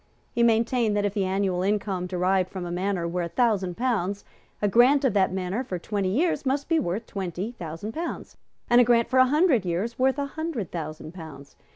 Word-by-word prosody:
He 235 - -1
maintained 230 -1 +2
that 205 - +1
if 200 - -1
the 200 -3 0
annual 190 -1 0
income 195 -2 -1
derived 185 +1 +1
from 185 -2 -6
a 175 - -5
manor 180 -1 -1
were 175 +1 -2
a 170 - -3
thousand 195 -6 0
pounds, 205 -6 -1 0.3
a 205 - +1
grant 255 +7 +5
of 255 - +2
that 190 -2 +2
manor 190 +5 -2
for 185 -8 -4
twenty 195 +1 -2
years 290 - +1
must 275 +1 -1
be 330 -1 +2
worth 195 - -2
twenty 190 +1 -4
thousand 170 -1 -7
pounds, 335 +7 -5 0.3
and 240 0 +6
a - - +7
grant 235 -1 +3
for 260 - +3
a 255 - +6
hundred 295 - +3
years 190 +8 -2
worth 265 +1 +2
a 285 - -1
hundred 280 - -4
thousand 155 -1 -6
pounds. 160 -5 -11
205 Hz, 210 wpm, -25 LUFS, 180-245 Hz, 0.3 s, a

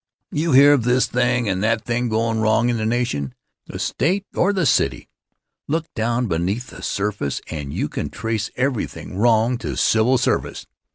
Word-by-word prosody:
You 155 0 0
hear 140 +2 +8
of 135 -5 +2
this 125 +2 +3
thing 125 -1 0
or 95 - +1
that 110 +3 0
thing 120 0 -1
goin' 115 0 0
wrong 110 +2 +2
in 120 - 0
the 110 0 -1
nation, 110 - -1 0.3
the - - -7
State 185 - 0
or 195 - +2
the 185 -4 0
city. - - +1 0.6
Look 160 +2 -1
down 120 +2 0
beneath 95 +6 -2
the - - -11
surface 100 -8 -2
and 75 -4 -5
you - - -2
can - - -4
trace 110 -1 -3
everything 125 -7 -3
wrong 115 +3 +2
to 70 -5 -4
civil 110 - +3
service. 125 - -1
115 Hz, 175 wpm, -21 LUFS, 110-125 Hz, 0.6 s, hear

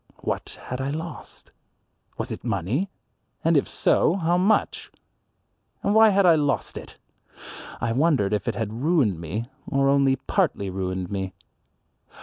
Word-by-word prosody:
What - - -4
had 125 +1 -5
I 135 - -2
lost? 160 +2 -7 0.7
Was - - -3
it - - -6
money? 115 - -1 0.5
And 165 +1 +3
if 145 - +3
so, 170 - +2
how 175 -2 +1
much? 190 +5 +1 0.9
And 200 - +2
why 220 0 +7
had 200 -1 +3
I 170 - +7
lost 145 -3 0
it? - - -9 0.8
I 115 - -1
wondered 130 -6 +2
if 105 - -1
it 115 - -1
had 110 0 -3
ruined 140 - +2
me 100 +8 -4 0.2
or 135 0 +2
only 140 -1 +4
partly 135 - -1
ruined 95 -1 -3
me. 95 -1 -3
135 Hz, 145 wpm, -24 LUFS, 100-165 Hz, 0.9 s, why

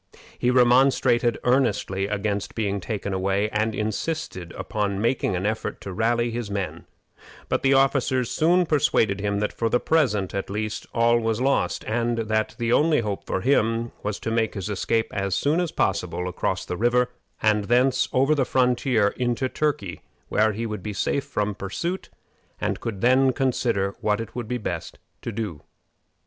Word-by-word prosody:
He 125 - +2
remonstrated 125 -1 +4
earnestly 105 -6 +1
against 100 -1 -2
being 100 -3 -1
taken 100 0 -4
away, 100 +3 0
and 110 +1 0
insisted 105 - -3
upon 100 -2 -2
making 115 -3 +1
an 90 +2 -2
effort 110 +1 -2
to 95 - -6
rally 120 +3 +1
his 115 -2 -4
men; 100 -2 -4 0.6
but - - +1
the 135 0 +4
officers 130 -2 +2
soon 175 +3 +3
persuaded 115 - +2
him 100 0 0
that 105 - -1
for 115 - -1
the 120 - +2
present, 110 - +1
at 100 - -3
least, 105 +1 -3
all 120 0 +3
was 115 -1 -1
lost, 130 -9 +1
and 115 +1 0
that 110 -1 -1
the 120 -1 0
only 155 -1 +4
hope 105 -3 -4
for 95 - -1
him 115 -2 +1
was 105 0 -3
to 115 - -2
make 115 -1 0
his 95 -1 -4
escape 110 +3 0
as 100 -2 -1
soon 150 +4 +1
as 175 -3 -1
possible 90 - -1
across 90 - -2
the 90 - -4
river, 125 +3 +2 0.3
and 105 -1 +2
thence 125 +4 +2
over 135 +3 +3
the 145 -3 +2
frontier 125 -4 +2
into 125 +1 0
Turkey, 115 - -2 0.3
where 110 +1 +3
he 115 +3 -3
would 105 -3 -4
be 105 +3 -5
safe 140 +7 -1
from 105 -7 -1
pursuit, 170 - -4 0.5
and - - -1
could 110 -5 -5
then 130 +2 +4
consider 115 -7 0
what 105 0 +1
it 115 -1 -6
would 120 -3 -4
be 125 +1 -1
best 85 -7 -5 0.2
to 120 - -4
do. 105 -8 -4
115 Hz, 175 wpm, -24 LUFS, 100-125 Hz, 0.6 s, remonstrated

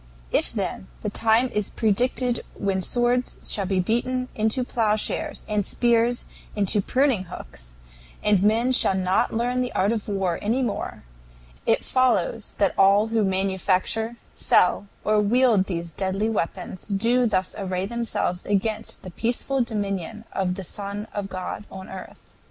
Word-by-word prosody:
If, - - +1
then, - - -3
the - - -3
time 225 +3 +3
is 210 -3 -1
predicted 245 +3 +1
when 195 -1 -1
swords 245 +4 +1
shall 195 -3 +1
be 190 -1 +1
beaten 250 +6 0
into 220 +4 0
plowshares 215 -3 -1
and 210 -1 +1
spears 235 +3 +2 0.3
into 205 0 +2
pruning 255 -3 +1
hooks, - - -10 0.5
and 205 -3 +4
men 225 +5 +3
shall 195 -6 +3
not 185 0 +1
learn 245 +2 0
the 250 - -2
art 195 +3 +2
of 225 -3 -2
war 195 -4 -1
any 235 +6 +1
more, 225 -5 -4 0.6
it - - +3
follows 235 -4 +1
that 200 -2 +2
all 200 +3 +5
who 225 -1 +2
manufacture, 190 +4 +1 0.2
sell, 190 +3 +3 0.2
or 215 0 +3
wield 220 -2 +3
these 170 -2 -4
deadly 195 +5 -1
weapons 185 -3 -3
do 230 +5 +2
thus 185 -4 0
array 185 -2 -2
themselves 225 -5 -2
against 215 +2 -1
the 185 - -8
peaceful 245 +6 -1
dominion 210 -2 -3
of 180 -1 0
the 195 - -6
Son 200 +3 -5
of 200 -1 -3
God 185 +2 -5
on 190 0 -9
earth. 190 -1 -10
210 Hz, 150 wpm, -24 LUFS, 190-235 Hz, 0.6 s, all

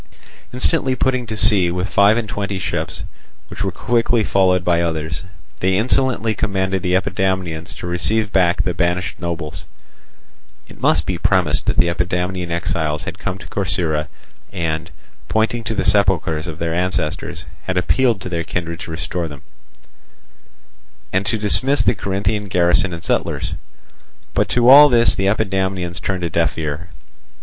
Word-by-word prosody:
Instantly 130 +1 +1
putting 130 -2 0
to 110 0 -4
sea 95 -5 +6
with 90 +2 -2
five 100 +2 +4
and 115 -2 -2
twenty 100 +1 -3
ships, 95 0 -3 0.5
which - - -5
were 95 - -1
quickly 115 +3 +1
followed 90 -2 +2
by 85 -1 +2
others, 80 +1 -3 0.3
they 95 0 +1
insolently 120 -1 +1
commanded 95 -3 -1
the 90 0 0
Epidamnians 95 -4 -1
to - - -8
receive 105 +5 0
back 90 -2 +2
the 90 - -1
banished 90 +1 -1
nobles—(it 80 -7 -10
must - - +2
be - - -2
premised - - +1
that - - 0
the - - +5
Epidamnian 90 +1 -2
exiles 80 -3 -2
had - - -7
come 90 - -4
to - - -12
Corcyra 80 -5 0 0.4
and, 80 0 -3 0.4
pointing 115 +2 0
to 110 - -2
the - - -1
sepulchres 85 -6 +2
of 80 -2 -6
their 85 -1 -2
ancestors, 90 -3 -2 0.2
had 95 -1 -2
appealed 115 +4 +2
to 95 - -6
their 85 -1 -2
kindred 85 -1 -4
to 95 - -8
restore 85 +1 -3
them)—and - - -11
to 110 - +1
dismiss 130 +7 +2
the - - +3
Corinthian 100 +1 -2
garrison 90 0 +2
and 85 -1 -7
settlers. - - -1 0.8
But - - +1
to 120 -1 +2
all 145 +3 +10
this 120 -2 +5
the 95 - -1
Epidamnians 95 -4 -1
turned 95 -2 -2
a 85 - -1
deaf 85 +1 0
ear. 80 +2 -4
90 Hz, 155 wpm, -19 LUFS, 85-100 Hz, 0.8 s, all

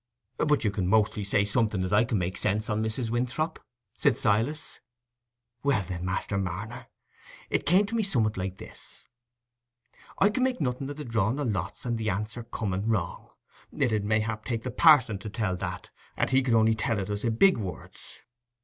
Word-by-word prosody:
"But 150 0 +2
you 105 - +2
can 95 -3 -1
mostly 105 0 +2
say 100 +1 +2
something 105 -3 +1
as 95 +2 -2
I 105 +3 +5
can 110 - 0
make 90 0 -2
sense 105 +3 -1
on, 105 +1 0
Mrs. 110 +1 -2
Winthrop," 125 +7 -1 0.3
said - - +2
Silas. 115 +9 0 0.8
"Well, 140 -7 +2
then, 90 -2 -4
Master 95 +2 -1
Marner, 105 +7 -5 0.6
it - - 0
come 185 +6 +5
to 200 - -8
me 230 - +2
summat 120 - +1
like 95 0 -4
this: - - -12 1.1
I 195 - +5
can 255 - -1
make 255 -3 +1
nothing 135 -1 -2
o' - - -4
the 150 0 -7
drawing 115 +3 0
o' - - 0
lots 100 -7 -3
and 120 -2 -1
the 110 -1 -1
answer 105 +5 -3
coming 110 -3 -3
wrong; 95 -7 -2 0.4
it 125 -5 0
'ud 105 -1 +1
mayhap 110 +1 0
take 115 -2 -3
the 125 - -3
parson 130 - +5
to 105 - -6
tell 105 -3 -1
that, - - -5 0.3
and - - +1
he 130 0 +5
could 125 -3 +2
only 110 0 +5
tell 110 0 -1
us 100 +1 -3
i' 120 - +2
big 150 +9 +4
words. 95 -4 -7
110 Hz, 190 wpm, -28 LUFS, 100-125 Hz, 1.1 s, I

